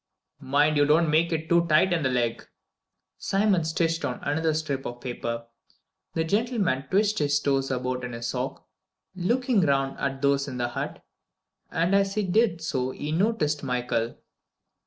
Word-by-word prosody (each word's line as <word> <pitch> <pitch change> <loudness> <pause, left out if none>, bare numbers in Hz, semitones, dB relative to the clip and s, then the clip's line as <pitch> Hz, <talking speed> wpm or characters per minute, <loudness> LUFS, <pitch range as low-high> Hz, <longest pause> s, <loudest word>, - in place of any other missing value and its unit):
"Mind 145 +3 +2
you 145 - +5
don't 155 +1 +4
make 165 +2 +3
it 160 -1 -2
too 170 +1 +3
tight 170 +4 +4
in 165 - +1
the 130 - +1
leg." 120 -2 -1 0.8
Simon 195 -3 +2
stitched 165 0 0
on 130 -3 -2
another 160 +3 +1
strip 140 -4 -2
of 120 0 -7
paper. 115 -2 -4 0.7
The 160 - +1
gentleman 200 - 0
twitched 210 +2 +2
his 145 -1 +2
toes 135 -2 0
about 125 -1 -2
in 125 -1 -5
his 115 0 -5
sock, 130 +2 -4 0.5
looking 235 +4 +1
round 135 -4 +1
at 135 0 -3
those 140 0 +2
in 130 -2 -5
the 120 -1 -1
hut, - - -5 0.6
and 170 +4 0
as 195 0 +2
he 215 - +1
did 190 -3 +1
so 130 -4 -1
he 145 +3 -5
noticed 160 -5 +1
Michael. 125 -3 -1
150 Hz, 165 wpm, -26 LUFS, 130-175 Hz, 0.8 s, you